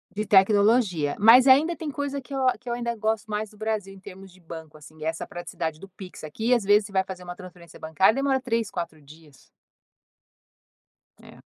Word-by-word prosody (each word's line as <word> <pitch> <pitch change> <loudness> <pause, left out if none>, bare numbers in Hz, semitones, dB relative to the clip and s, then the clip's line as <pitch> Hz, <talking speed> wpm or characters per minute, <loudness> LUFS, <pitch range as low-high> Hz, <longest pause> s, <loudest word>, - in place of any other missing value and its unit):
De 215 - -2
tecnologia, 200 -5 +3
mas 230 +5 +7
ainda 295 +6 +5
tem 310 -2 -6
coisa 280 0 -4
que 255 +2 -12
eu 265 -1 0
a 255 - +2
que 250 - -10
eu 235 - -1
ainda 235 -1 -3
gosto 220 0 -2
mais 210 0 -3
do 210 - -20
Brasil, 215 -3 -3
em 195 - -14
termos 190 0 -12
de 185 - -20
banco 160 -2 -11
assim, 155 +1 -14
essa 160 +1 -3
praticidade 165 -2 -6
do 195 - -12
PIX 185 -3 -12
aqui, 220 +11 -1
às 240 - +2
vezes 205 +1 +4
você - - -16
vai 190 0 +2
fazer 185 -1 -9
uma 175 0 -8
transferência 180 -3 -14
bancária 160 +7 +2
demora 275 -1 +1
3, 230 -4 -2
4 165 -3 -6
dias. 150 -1 -18 1.8
É. - - -15
200 Hz, 205 wpm, -25 LUFS, 175-235 Hz, 1.8 s, mas